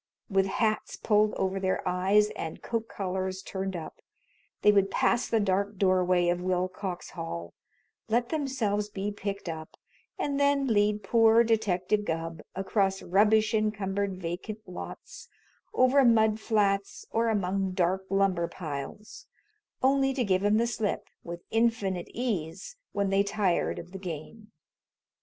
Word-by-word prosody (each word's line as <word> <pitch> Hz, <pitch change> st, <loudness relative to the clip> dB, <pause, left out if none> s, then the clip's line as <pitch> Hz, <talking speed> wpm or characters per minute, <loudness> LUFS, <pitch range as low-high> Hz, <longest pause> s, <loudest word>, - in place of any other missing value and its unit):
With 195 Hz, 0 st, +3 dB
hats 215 Hz, +2 st, 0 dB
pulled 210 Hz, -1 st, +2 dB
over 190 Hz, 0 st, -1 dB
their 190 Hz, -1 st, -1 dB
eyes 195 Hz, +4 st, +3 dB
and 160 Hz, -, -6 dB
coat 230 Hz, -1 st, -2 dB
collars 190 Hz, -1 st, -3 dB
turned 190 Hz, -1 st, -4 dB
up, 165 Hz, -2 st, -7 dB, 0.6 s
they 210 Hz, -, +7 dB
would 200 Hz, -1 st, +3 dB
pass 240 Hz, +4 st, +1 dB
the 225 Hz, -, +2 dB
dark 200 Hz, 0 st, 0 dB
doorway 185 Hz, -2 st, +3 dB
of 175 Hz, 0 st, 0 dB
Willcox 185 Hz, 0 st, -2 dB
Hall, 85 Hz, -, -6 dB, 0.6 s
let 235 Hz, +2 st, +1 dB
themselves 235 Hz, -9 st, -1 dB
be 205 Hz, 0 st, -3 dB
picked 200 Hz, -1 st, -5 dB
up, 160 Hz, -1 st, -6 dB, 0.4 s
and 285 Hz, -1 st, -1 dB
then 280 Hz, -1 st, +3 dB
lead 210 Hz, -3 st, +2 dB
poor 225 Hz, +2 st, +5 dB
Detective 210 Hz, -3 st, +1 dB
Gubb 165 Hz, -2 st, -3 dB
across 195 Hz, 0 st, 0 dB
rubbish 210 Hz, +3 st, +3 dB
encumbered 200 Hz, -3 st, -1 dB
vacant 185 Hz, +5 st, -5 dB
lots, 180 Hz, -, -9 dB, 0.4 s
over 260 Hz, +2 st, +4 dB
mud 220 Hz, -3 st, +4 dB
flats 200 Hz, -3 st, 0 dB
or 230 Hz, 0 st, +1 dB
among 195 Hz, -2 st, 0 dB
dark 185 Hz, +1 st, +1 dB
lumber 195 Hz, -3 st, +2 dB
piles, 155 Hz, +5 st, -7 dB, 0.6 s
only 270 Hz, 0 st, +3 dB
to 260 Hz, -, +1 dB
give 190 Hz, -3 st, +1 dB
him 205 Hz, +1 st, +4 dB
the 230 Hz, -, +3 dB
slip 220 Hz, -3 st, -2 dB
with 170 Hz, 0 st, -7 dB
infinite 225 Hz, -6 st, +1 dB
ease 230 Hz, -, -3 dB, 0.2 s
when 200 Hz, -1 st, 0 dB
they 195 Hz, 0 st, +4 dB
tired 200 Hz, -3 st, 0 dB
of 175 Hz, +1 st, -8 dB
the 190 Hz, -, -7 dB
game. 185 Hz, +5 st, -8 dB
200 Hz, 140 wpm, -28 LUFS, 185-220 Hz, 0.6 s, they